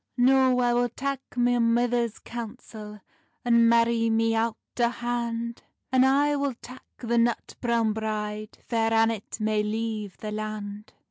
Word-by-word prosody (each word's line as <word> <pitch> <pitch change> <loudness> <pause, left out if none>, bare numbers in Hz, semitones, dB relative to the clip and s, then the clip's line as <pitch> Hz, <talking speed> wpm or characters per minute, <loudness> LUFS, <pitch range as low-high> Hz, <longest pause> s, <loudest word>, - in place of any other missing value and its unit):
"No, 260 0 +4
I 240 0 +2
will 245 0 +2
tak 275 +3 -3
my 245 0 +2
mither's 235 0 +1
counsel, 220 -3 -8 0.4
And 235 -1 +5
marrie 230 0 +3
me 225 0 +2
owt 225 0 0 0.2
o 235 -1 +4
hand; 235 -1 -3 0.3
And 260 0 +5
I 290 +2 +3
will 280 -3 -1
tak 250 +2 -12
the 235 -1 0
nut 235 0 0
browne 235 -3 +1
bride, 215 -1 -4
Fair 225 -1 +1
Annet 225 -1 +1
may 215 0 +1
leive 215 -2 -3
the 215 - -6
land." 210 0 -6
230 Hz, 145 wpm, -26 LUFS, 220-245 Hz, 0.4 s, And